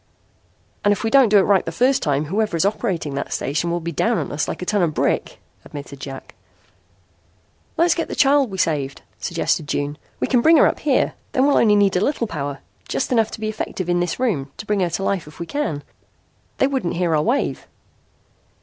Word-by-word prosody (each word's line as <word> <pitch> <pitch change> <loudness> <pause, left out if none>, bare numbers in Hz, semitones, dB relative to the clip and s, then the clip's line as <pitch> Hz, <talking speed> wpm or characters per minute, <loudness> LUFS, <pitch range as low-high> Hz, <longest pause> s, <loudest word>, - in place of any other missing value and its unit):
"And 205 - +4
if 205 - -1
we 225 - 0
don't 270 -5 +6
do 210 - +6
it 195 - +5
right 200 -2 +3
the - - -4
first 260 +2 +2
time, 145 0 0
whoever 200 +2 -1
is 165 - +2
operating 190 - -1
that 140 - -4
station 155 +5 -1
will 170 0 0
be 170 0 -4
down 225 +8 +1
on - - -3
us 145 - -1
like - - -4
a - - -5
ton 205 +1 +1
of 160 -3 0
brick," - - -1 0.2
admitted 140 -1 -9
Jack. 135 -1 -8 1.4
"Let's 340 +1 +4
get 335 - -2
the - - -5
child 275 -2 +4
we 190 - -6
saved," 145 -6 -1 0.2
suggested 150 - -1
June. 145 +1 -2 0.2
"We - - +1
can 250 -3 +2
bring 320 +5 +6
her - - +6
up - - +1
here. 285 -3 +1 0.2
Then 260 0 +3
we'll 285 - +4
need 215 -2 +5
only 205 -1 +4
a 180 - +2
little 245 - -3
power, 145 -7 -5 0.3
just - - -2
enough 225 -3 +3
to - - -8
be 215 - -3
effective 190 -4 -4
in 175 0 +2
this 175 +4 -2
room, 175 - 0
to - - -7
bring 210 -1 0
her 180 -2 +1
to 195 - -3
life 195 -5 -1
if 150 - -14
we 170 - -4
can. 165 - -3 0.7
They - - +3
wouldn't 265 -10 -1
hear 170 -3 +1
our 150 - +2
wave." 245 - -1
195 Hz, 220 wpm, -21 LUFS, 155-235 Hz, 1.4 s, don't